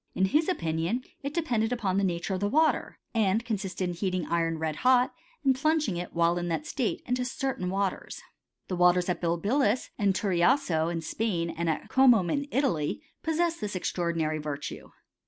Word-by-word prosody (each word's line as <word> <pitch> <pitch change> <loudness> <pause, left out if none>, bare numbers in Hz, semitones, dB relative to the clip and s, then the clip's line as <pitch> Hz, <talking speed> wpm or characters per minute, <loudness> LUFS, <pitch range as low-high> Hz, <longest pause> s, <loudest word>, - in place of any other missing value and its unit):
In 190 - +3
his 305 +11 +2
opi 165 - -1
nion 175 +11 -1 0.2
it 280 0 -3
depended 245 -9 0
upon 200 -6 0
the - - 0
nature 175 0 -1
of 185 - -1
the 205 +1 0
water, 315 +6 +2 0.2
and 220 0 +2
consisted 195 -5 -2
in 175 - -2
heating 185 -1 -2
iron 165 -1 0
red 155 -1 -2
hot, 255 0 +4 0.3
and 270 -2 +4
plunging 300 - +1
it, 175 +1 -5
while 170 +1 +3
in 175 - -3
that 160 -3 -2
state, 245 - -2
into 250 0 0
certain 250 -6 -2
waters. 195 0 -2 0.5
The 185 - -2
waters 180 0 +4
at 180 - -1
Bilbilis 205 +8 +1
and 200 -2 +2
Turiasso, 180 - +2
in 165 -1 -2
Spain, 170 -1 -1
and 170 0 -2
at 160 - -2
Comum, 240 -10 +5
in 285 0 -1
Italy, 260 - 0 0.2
possessed 335 -1 0
this 210 -2 -3
extraordinary 170 -3 -1
virtue. 150 -1 -6
190 Hz, 180 wpm, -28 LUFS, 170-250 Hz, 0.5 s, Comum